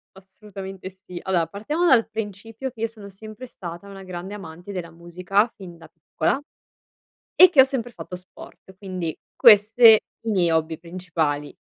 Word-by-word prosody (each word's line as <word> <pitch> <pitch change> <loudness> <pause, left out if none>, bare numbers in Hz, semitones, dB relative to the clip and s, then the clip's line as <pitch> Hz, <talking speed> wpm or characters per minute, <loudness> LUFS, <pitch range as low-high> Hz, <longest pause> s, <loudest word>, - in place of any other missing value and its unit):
Assolutamente 190 -1 -10
sì. 185 -2 -11
Allora 175 -4 0
partiamo 295 - -2
dal 245 -9 +4
principio 220 +3 -6
che 230 -3 -13
io 225 - +1
sono 215 -3 -13
sempre 215 +5 -11
stata 175 -5 -9
una 195 -1 -10
grande 185 +1 -7
amante 180 -1 -9
della 175 -3 -6
musica 180 +5 0
fin 180 -4 -11
da 165 - -15
piccola 160 +5 -2 1.0
e 365 -1 +8
che 295 - +6
ho - - +9
sempre 260 -3 -4
fatto 185 -5 -9
sport, 185 +1 -15
quindi 185 -5 -5 0.2
queste 220 +1 +7 0.3
i - - 0
miei 180 -5 +2
hobby 160 0 0
principali. 165 -4 -3
190 Hz, 160 wpm, -23 LUFS, 175-220 Hz, 1.0 s, ho